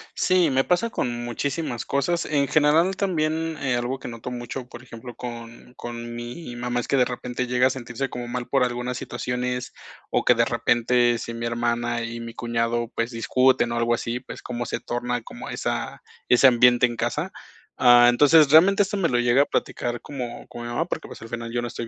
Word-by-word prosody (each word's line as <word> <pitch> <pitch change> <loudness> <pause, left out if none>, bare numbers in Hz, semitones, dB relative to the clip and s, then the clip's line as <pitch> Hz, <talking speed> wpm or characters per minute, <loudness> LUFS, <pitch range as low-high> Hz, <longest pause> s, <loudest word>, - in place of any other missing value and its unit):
Sí, 180 -5 +3
me 135 0 +3
pasa 225 +6 +1
con 120 -1 -2
muchísimas 135 +1 -3
cosas. 170 +5 0
En 140 -2 +1
general 160 +5 +3
también, 160 -4 -1
eh, 130 -3 0
algo 120 +2 -2
que - - -9
noto 115 +1 -7
mucho, 125 +1 -6
por 120 +1 -11
ejemplo, 120 0 -10
con 120 0 -9
con 120 -1 -7
mi 120 +2 -7
mamá 125 0 -2
es - - -8
que 140 - +1
de 125 - +4
repente 125 0 -4
llega 125 +1 +2
a - - +5
sentirse 130 +1 -4
como 120 -1 -6
mal 120 0 -4
por 135 -2 +2
algunas 125 0 -2
situaciones, 125 +1 -3 0.4
o - - +1
que 125 - +5
de 115 0 +3
repente, 120 0 +2
si 115 - -6
mi 115 0 -3
hermana 120 0 -1
y 115 0 -5
mi 115 0 -8
cuñado, 120 0 -1
pues, 115 +1 -1
discuten 125 +1 +2
o - - -2
algo 120 0 +2
así, 120 +1 -3
pues, - - -10
como 120 -1 -4
se - - -3
torna 120 -1 -3
como - - -9
esa - - -4 0.3
ese 125 +2 +5
ambiente 120 0 +6
en 120 -1 -3
casa. - - -2 0.4
Ah, 120 -1 +7
entonces 145 +3 +5
realmente 195 +6 +6
esto 205 +1 -3
me 170 -4 +1
lo 120 - +1
llega 120 +3 +4
a - - +3
platicar, 120 0 -2
como 125 -4 -7
con 120 - -9
mi 120 - -6
mamá 120 +8 -1
porque - - -5
pues, - - -11
al 115 - -10
final 115 0 -5
yo 120 0 -2
no - - -2
estoy 115 -1 -6
120 Hz, 210 wpm, -24 LUFS, 120-135 Hz, 0.4 s, Ah